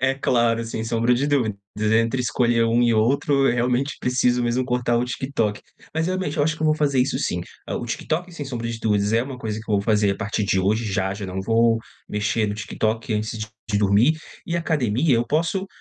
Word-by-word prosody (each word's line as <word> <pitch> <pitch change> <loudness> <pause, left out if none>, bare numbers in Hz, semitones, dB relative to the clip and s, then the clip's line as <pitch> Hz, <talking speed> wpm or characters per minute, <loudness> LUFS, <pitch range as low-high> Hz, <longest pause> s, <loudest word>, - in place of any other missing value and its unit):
É 130 +1 +2
claro, 115 -3 +1
sem 115 0 -4
sombra 115 +1 +1
de 135 +4 +1
dúvidas, 120 -9 +1 0.4
entre 115 +3 -1
escolher 120 -1 +2
um 115 +1 +2
e 115 -1 +3
outro, 135 +4 +2
eu, - - +3
realmente, 125 +3 0
preciso 125 -1 +1
mesmo 120 +2 0
cortar 125 -1 0
o 120 - +1
TikTok. 125 -4 -2 0.3
Mas, 160 +1 0
realmente, 185 -1 -2
eu 145 - +2
acho 160 0 +1
que 160 - -6
eu - - +3
vou 155 - +4
fazer 140 -4 +1
isso 130 +1 0
sim. 90 -9 -1 0.3
O - - -3
TikTok, 175 +3 -3
sem 145 -4 -6
sombra 115 -3 -4
de 115 -1 -4
dúvidas, 105 -1 +1
é 115 - +4
uma 135 -2 -7
coisa 110 -3 -4
que 110 - -11
eu 105 - +2
vou 100 - +2
fazer 105 -2 +2
a - - -6
partir 110 -1 -2
de 95 -1 +2
hoje, 110 +4 +1
já 95 -2 -1
já 100 -1 -6
não 95 +1 -4
vou 115 +1 +3 0.3
mexer 105 +1 0
no 105 - -2
TikTok 110 +2 -2
antes 110 +2 -2
de 110 -1 -5
dormir 105 +9 +4 0.3
e 170 0 -1
academia, 145 -4 +1
eu 120 +1 0
posso, 170 +7 0
115 Hz, 225 wpm, -23 LUFS, 110-135 Hz, 0.4 s, vou